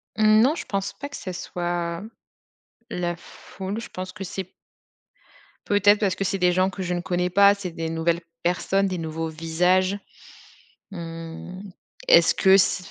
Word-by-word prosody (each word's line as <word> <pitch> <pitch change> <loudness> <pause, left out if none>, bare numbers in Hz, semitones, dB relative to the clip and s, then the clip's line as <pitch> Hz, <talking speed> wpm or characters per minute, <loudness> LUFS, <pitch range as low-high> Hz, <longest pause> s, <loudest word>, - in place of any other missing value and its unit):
Mmh 215 0 +5
non, 270 +7 +4
je - - -6
pense 195 -1 -3
pas 285 - -7
que 285 - -8
ça 185 - -6
soit, 175 0 -3 0.9
la 175 -5 -2
foule. 190 +4 -7
Je 230 - -8
pense 185 0 -6
que 190 - -8
c'est 190 +1 -4 1.2
peut-être 205 0 +4
parce 195 -4 +1
que 195 - -2
c'est 195 0 -1
des 180 -1 +3
gens 185 +1 +2
que 190 0 -7
je 180 -1 -2
ne 175 - -2
connais 180 0 -1
pas, 200 +2 +6
c'est 200 -3 -6
des 165 0 -4
nouvelles 165 +1 0 0.2
personnes, 195 +3 +1
des 185 -1 -3
nouveaux 160 0 -3
visages. 180 +4 +1 0.9
Mmh, 165 +1 -8 0.5
est-ce - - +6
que 190 -1 +6
si 185 -1 +2
185 Hz, 165 wpm, -24 LUFS, 170-195 Hz, 1.2 s, pas